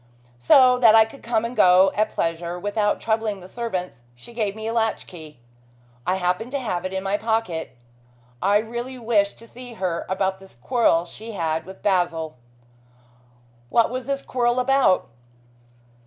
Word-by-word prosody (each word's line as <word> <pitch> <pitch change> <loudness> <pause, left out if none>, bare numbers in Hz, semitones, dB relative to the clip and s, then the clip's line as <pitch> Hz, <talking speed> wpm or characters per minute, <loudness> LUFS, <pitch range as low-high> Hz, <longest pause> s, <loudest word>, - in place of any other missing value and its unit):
So 250 - +5
that 225 -3 +7
I 220 0 +7
could 245 +5 -14
come 230 -1 0
and 240 +2 -5
go 185 -1 +6
at 215 +2 +1
pleasure 170 0 -3
without 205 +2 0
troubling 220 -2 -1
the 180 - -12
servants, 185 - -5
she 120 - -14
gave 210 -4 -2
me 220 0 -7
a 225 - -2
latch 225 -2 0
key. 155 -6 -12 0.7
I 185 - +2
happened 185 +5 -1
to 280 - 0
have 185 -8 -3
it 185 - -3
in 190 0 -3
my 195 +1 0
pocket. 210 - -2 0.6
I 200 +2 +4
really 240 +4 -5
wished 220 -4 +1
to 230 - -14
see 245 +1 -11
her 185 -5 -3
about 190 0 -1
this 195 -6 -16
quarrel 175 - +2
she 220 +6 -10
had 160 -4 -2
with 190 - -12
Basil." 175 -6 0 1.3
"What 230 - +3
was 255 0 -5
this 275 0 -2
quarrel 240 0 0
about?" 260 -7 +3
210 Hz, 170 wpm, -23 LUFS, 180-235 Hz, 1.3 s, that